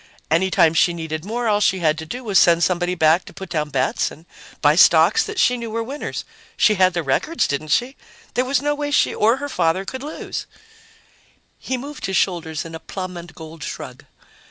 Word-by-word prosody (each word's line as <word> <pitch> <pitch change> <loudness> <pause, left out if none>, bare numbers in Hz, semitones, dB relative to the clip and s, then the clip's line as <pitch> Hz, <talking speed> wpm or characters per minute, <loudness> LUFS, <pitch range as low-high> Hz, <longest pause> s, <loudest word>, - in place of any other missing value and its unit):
Any 180 +4 +3
time 165 -3 +4
she 170 +1 +3
needed 160 -1 -5
more, 235 +3 -2
all 205 -1 +2
she 190 -2 +3
had 155 -4 +2
to 160 - -7
do 250 +9 -6
was 205 -4 +3
send 170 -2 +4
somebody 180 0 0
back 160 +1 +3
to - - -12
put 190 -1 -9
down 155 -3 -2
bets 130 -2 0
and 160 - -15 0.3
buy 150 0 +4
stocks 170 +2 +5
that 425 -2 -5
she 250 -7 +3
knew 235 -1 -6
were 230 +1 -2
winners. 275 +5 -5 0.3
She 215 - +4
had 185 -2 +3
the 170 - -1
records, 155 - 0
didn't 140 +2 -3
she? 245 - 0 0.4
There 250 - +1
was 270 +1 0
no 295 0 +1
way 290 0 -3
she 290 - +2
or 225 +4 +3
her 285 +1 -4
father 185 -6 0
could 260 +5 -6
lose!" 295 +3 -6 1.1
He 260 - -3
moved 285 0 -6
his 190 -1 0
shoulders 165 -5 -1
in 165 - -9
a 160 - -6
plum 185 0 -6
and 170 -1 -9
gold 160 -2 -10
shrug. - - -8
185 Hz, 215 wpm, -21 LUFS, 160-240 Hz, 1.1 s, stocks